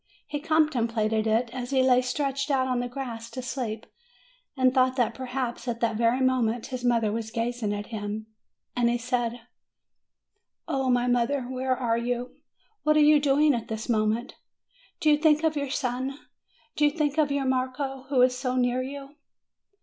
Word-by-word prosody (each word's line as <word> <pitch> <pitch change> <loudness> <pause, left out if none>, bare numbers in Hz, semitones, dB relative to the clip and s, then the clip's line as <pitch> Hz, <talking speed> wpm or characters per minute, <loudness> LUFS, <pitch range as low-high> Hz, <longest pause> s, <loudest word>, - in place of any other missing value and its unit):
He 295 0 -4
contemplated 235 -9 +1
it, 230 +2 +1
as 250 -1 -5
he 265 -1 +3
lay 255 -1 +5
stretched 275 +2 -2
out 265 -2 +2
on 250 -1 0
the 245 - -2
grass 240 -3 -6
to 255 +2 -6
sleep, 240 -4 -4 0.7
and 255 -1 +3
thought 255 -1 +3
that, 235 -3 +1
perhaps, 255 -1 -4
at 235 -1 -2
that 225 -2 +1
very 235 +3 +2
moment, 245 -3 +1
his 250 -1 -4
mother 230 -3 +2
was 220 0 -3
gazing 230 -1 -2
at 205 0 -3
him. 210 0 -4 0.5
And 240 -1 +2
he 240 - +1
said: 240 -1 -2 1.3
"O 270 -5 0
my 245 -1 +3
mother, 245 +2 +1
where 255 +1 -1
are 235 -3 0
you? 245 +1 -3 0.5
What 305 0 +3
are - - +6
you 300 0 +6
doing 290 +1 +3
at 230 -2 -3
this 220 0 -5
moment? 220 0 0 0.7
Do 310 - +4
you 295 - +5
think 305 0 +3
of 320 -1 +2
your 280 -2 -2
son? 260 0 -2 0.6
Do 295 - 0
you 295 - +6
think 295 0 -1
of 295 -2 +2
your 280 -1 0
Marco, 260 +1 -2
who 260 -3 +4
is 250 0 +3
so 255 0 -2
near 250 0 +1
to 255 - -4
you?" 280 +1 -9
255 Hz, 185 wpm, -26 LUFS, 235-275 Hz, 1.3 s, are